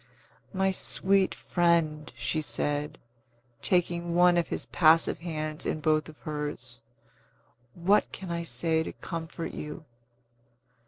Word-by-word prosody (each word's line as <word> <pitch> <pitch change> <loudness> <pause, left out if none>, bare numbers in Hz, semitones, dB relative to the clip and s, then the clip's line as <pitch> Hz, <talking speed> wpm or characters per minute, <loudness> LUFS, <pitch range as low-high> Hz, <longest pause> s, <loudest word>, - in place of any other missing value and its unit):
"My 190 -1 +1
sweet 190 0 +1
friend," 165 -3 +1
she 120 +7 -1
said, 150 +1 -2 0.6
taking 175 -1 +1
one 175 0 +5
of 170 -1 +1
his - - -4
passive 165 -1 +4
hands 155 -2 -4
in - - -1
both 155 0 +1
of 155 - -13
hers, 145 -5 -5 0.9
"what 190 +5 +2
can 190 -2 -7
I 170 0 -2
say 165 -1 +3
to - - -5
comfort 165 -1 -6
you?" 150 +2 -7
165 Hz, 120 wpm, -28 LUFS, 155-175 Hz, 0.9 s, one